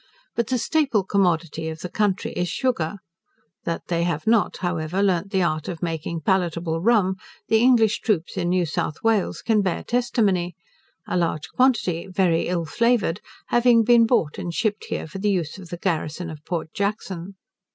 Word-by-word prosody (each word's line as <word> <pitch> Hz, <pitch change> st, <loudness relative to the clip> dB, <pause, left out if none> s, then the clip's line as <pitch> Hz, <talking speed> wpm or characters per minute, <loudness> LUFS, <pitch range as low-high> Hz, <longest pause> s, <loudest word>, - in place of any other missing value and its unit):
But 235 Hz, -2 st, 0 dB
the 255 Hz, -, +1 dB
staple 265 Hz, -6 st, +1 dB
commodity 170 Hz, -5 st, 0 dB
of 160 Hz, 0 st, -7 dB
the 180 Hz, -, -4 dB
country 195 Hz, +1 st, 0 dB
is 180 Hz, 0 st, -2 dB
sugar. 205 Hz, -10 st, -1 dB, 0.7 s
That 170 Hz, -1 st, -2 dB
they 170 Hz, -1 st, 0 dB
have 170 Hz, -3 st, -1 dB
not, 225 Hz, -1 st, +2 dB
however, 175 Hz, +1 st, -1 dB
learnt 190 Hz, -1 st, +1 dB
the 190 Hz, -2 st, +1 dB
art 155 Hz, -2 st, -1 dB
of 175 Hz, -2 st, -5 dB
making 165 Hz, 0 st, -3 dB
palatable 170 Hz, -2 st, 0 dB
rum, 195 Hz, -3 st, +3 dB, 0.3 s
the 220 Hz, -, +5 dB
English 235 Hz, -3 st, +4 dB
troops 185 Hz, -7 st, -1 dB
in 175 Hz, -2 st, -1 dB
New 180 Hz, -1 st, +2 dB
South 155 Hz, -1 st, -3 dB
Wales 225 Hz, -4 st, +1 dB
can 220 Hz, -2 st, +3 dB
bear 185 Hz, -3 st, -1 dB
testimony; 200 Hz, -8 st, 0 dB, 0.5 s
a -, -, -2 dB
large 160 Hz, -3 st, -1 dB
quantity, 215 Hz, -9 st, +1 dB
very 180 Hz, -3 st, +1 dB
ill 175 Hz, -2 st, -1 dB
flavoured, 230 Hz, -1 st, +1 dB, 0.3 s
having 240 Hz, -1 st, +5 dB
been 235 Hz, 0 st, +5 dB
bought 170 Hz, -, +1 dB
and 170 Hz, -1 st, -4 dB
shipped 215 Hz, -2 st, -1 dB
here -, -, -3 dB
for 160 Hz, +5 st, -8 dB
the 210 Hz, +2 st, +1 dB
use 180 Hz, -2 st, -1 dB
of 180 Hz, -3 st, -11 dB
the 175 Hz, -, -5 dB
garrison 170 Hz, -1 st, -2 dB
of 155 Hz, -1 st, -10 dB
Port 165 Hz, -3 st, -4 dB
Jackson. 195 Hz, -2 st, -3 dB
185 Hz, 175 wpm, -23 LUFS, 165-215 Hz, 0.7 s, the